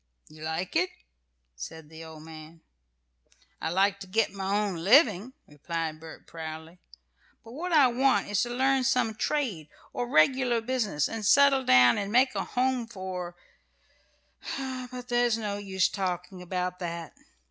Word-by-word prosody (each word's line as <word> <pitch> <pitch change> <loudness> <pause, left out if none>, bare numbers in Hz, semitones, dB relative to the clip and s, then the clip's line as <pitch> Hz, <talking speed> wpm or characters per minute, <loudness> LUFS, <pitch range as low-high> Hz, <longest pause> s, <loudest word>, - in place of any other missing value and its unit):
"You 155 0 -15
like 160 - -4
it?" 365 +3 +2 0.7
said 150 - -9
the 160 +1 -11
old 160 -1 -11
man. 160 0 -12 1.0
"I 160 - -1
like 195 +3 +2
to 195 - -9
get 215 +2 +1
my 195 -1 -3
own 195 -4 -3
living," 215 - +4
replied 155 +1 -5
Bert, 160 0 -12
proudly, 160 +1 -8 0.6
"but 230 - -13
what 340 +8 -5
I 300 -4 +6
want 255 -3 +2
is 205 -1 +1
to 240 - -1
learn 265 +2 +2
some 250 -4 +1
trade, 215 - -2 0.2
or 245 0 -3
regular 245 +7 +3
business, 225 - -1
and 225 -1 -5
settle 275 +4 +5
down, 125 - +5
and 200 0 -3
make 260 +3 +4
a - - -2
home 250 -2 -1
for 185 -5 -6 1.2
But 255 -2 -6
there's 240 -2 +2
no 210 -2 -3
use 190 -2 +1
talking 180 -1 -4
about 180 0 -3
that. 170 -2 -5
200 Hz, 150 wpm, -28 LUFS, 165-250 Hz, 1.2 s, I